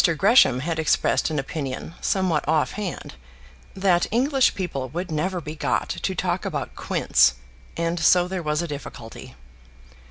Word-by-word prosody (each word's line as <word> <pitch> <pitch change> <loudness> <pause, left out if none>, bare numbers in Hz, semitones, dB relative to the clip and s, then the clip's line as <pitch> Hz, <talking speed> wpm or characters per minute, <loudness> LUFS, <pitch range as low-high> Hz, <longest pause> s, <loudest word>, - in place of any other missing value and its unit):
Gresham 195 - +5
had 165 +2 -2
expressed 160 - +1
an 155 - -3
opinion, 135 +1 -4
somewhat 185 -7 0
off 155 -1 +2
hand, 205 -5 -6 0.6
that 185 -2 +2
English 265 +3 +2
people 140 -9 -4
would 175 +4 -5
never 180 +4 -1
be 155 -1 -7
got - - -1
to - - -3
talk - - -1
about - - -4
quints, 65 -1 +2 0.4
and 170 +1 -1
so 175 +1 +4
there 185 0 -3
was 150 +1 -1
a - - -4
difficulty. 135 -6 -9
165 Hz, 150 wpm, -23 LUFS, 150-185 Hz, 0.6 s, Gresham